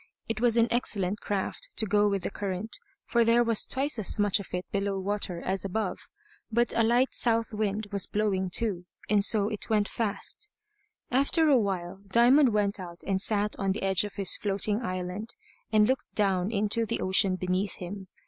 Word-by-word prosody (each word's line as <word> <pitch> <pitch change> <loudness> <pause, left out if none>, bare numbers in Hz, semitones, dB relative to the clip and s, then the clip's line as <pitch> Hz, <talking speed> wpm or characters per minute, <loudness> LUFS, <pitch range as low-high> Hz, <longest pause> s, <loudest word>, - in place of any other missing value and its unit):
It 225 0 -3
was 240 -1 +3
an 230 0 +4
excellent 205 -4 0
craft 205 - -3
to 220 - +2
go 210 0 +2
with 195 -3 -2
the - - -3
current, 200 +2 -4 0.3
for 235 -1 +2
there 230 +1 +4
was 230 -2 +3
twice 270 -2 +1
as 210 - +1
much 205 0 +2
of 200 - -8
it 180 0 -3
below 200 0 -1
water 195 -2 -1
as 190 +1 -2
above. 200 +3 -3 0.5
But 235 +2 +1
a - - +3
light 240 +4 +2
south 230 -1 0
wind 210 0 -2
was 200 -2 0
blowing 195 -3 -1
too, 180 -3 0 0.2
and 205 -1 +4
so 205 -1 +4
it 215 0 -5
went 210 -2 +2
fast. 230 - -2 0.6
After 280 +6 +3
a - - +4
little 265 -5 +5
while 190 -2 -3
Diamond 245 +6 +5
went 205 -1 0
out 175 -2 -9
and 190 -1 0
sat 210 0 0
on 195 -1 0
the 205 - -6
edge 190 -1 +2
of 205 -1 -7
his 195 -3 +2
floating 205 +2 0
island, 185 - -5 0.4
and 210 -1 +4
looked 260 +1 -2
down 195 -2 +1
into 215 +1 0
the 220 - -2
ocean 190 0 +2
beneath 185 +2 -2
him. 190 +1 -8
205 Hz, 195 wpm, -28 LUFS, 195-225 Hz, 0.6 s, little